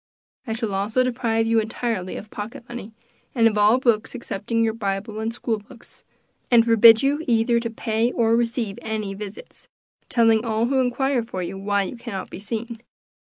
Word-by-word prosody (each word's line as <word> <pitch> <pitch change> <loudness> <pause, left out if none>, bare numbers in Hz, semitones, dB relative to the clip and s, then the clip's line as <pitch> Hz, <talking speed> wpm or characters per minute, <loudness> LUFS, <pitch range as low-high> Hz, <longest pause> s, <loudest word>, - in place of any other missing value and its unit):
I 225 - -1
shall 225 -3 -3
also 210 +6 +1
deprive 235 -3 0
you 225 0 +3
entirely 220 -3 -3
of 210 - -9
pocket 230 +6 -7
money, 240 -3 -8 0.4
and 230 -2 +5
of 215 - 0
all 210 +3 +5
books 235 -3 +1
excepting 230 -1 -2
your 225 -1 +1
Bible 210 0 -3
and 220 +1 -2
school 230 -2 -2
books, 230 +3 -16 0.5
and 235 -2 +5
forbid 230 0 +7
you 290 +3 +1
either 235 0 +3
to 230 0 -3
pay 225 +1 -1
or 230 -1 +2
receive 230 -3 -1
any 215 -2 -3
visits, 205 - -8 0.4
telling 225 -2 +3
all 225 -1 0
who 265 +2 +1
inquire 255 +1 +1
for 205 -5 -5
you, 175 +3 -5
why 200 +1 0
you 195 - -6
cannot 230 -5 -6
be - - -7
seen. 225 +2 -5
225 Hz, 180 wpm, -23 LUFS, 210-235 Hz, 0.5 s, forbid